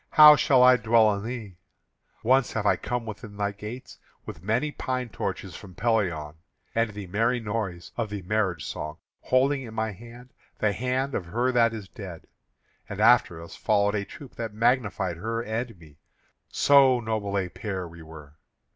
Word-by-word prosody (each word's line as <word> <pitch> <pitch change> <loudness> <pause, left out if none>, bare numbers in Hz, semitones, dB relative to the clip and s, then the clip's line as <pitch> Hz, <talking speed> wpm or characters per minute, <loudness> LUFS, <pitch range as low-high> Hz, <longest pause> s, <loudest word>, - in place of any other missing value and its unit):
how 150 -1 +9
shall 130 -3 +4
I 125 0 +7
dwell 110 -1 +4
in 100 - -6
thee? 110 -6 -6 0.7
Once 130 +2 +2
I 105 -2 +2
came 125 -1 -3
within 105 -1 -8
thy 100 0 0
gates 105 +5 -9 0.3
with - - -8
many 120 +10 0
pine 130 -3 -3
torches 90 - -5
from 95 -3 -11
Pelion, 90 -10 0 0.4
and 115 0 +1
the 105 -1 -7
merry 115 +7 0
noise 105 -6 -4
of 115 -3 -2
the 100 -2 -5
marriage 95 -5 -1
song, 75 +1 -5 0.2
holding 135 +2 +2
in 115 -4 -9
my 110 0 -1
hand 120 +5 -13 0.2
the 105 -1 +1
hand 130 +5 -1
of 90 - -3
her 120 +8 0
that 115 -2 +3
is 110 -4 -7
dead; 95 -6 -9 0.6
and 105 - -6
after 110 -7 +4
us 85 - -11
followed 105 -1 +1
a 100 -1 -1
troop 130 +6 -12
that 110 -3 -5
magnified 110 -7 +1
her 115 +5 -3
and 115 -1 -4
me, 75 -3 -18 0.5
so 135 -3 +5
noble 110 -3 -2
a 95 -2 0
pair 95 -2 -5
we 85 0 -13
were. 80 -2 -12
110 Hz, 175 wpm, -26 LUFS, 100-120 Hz, 0.7 s, how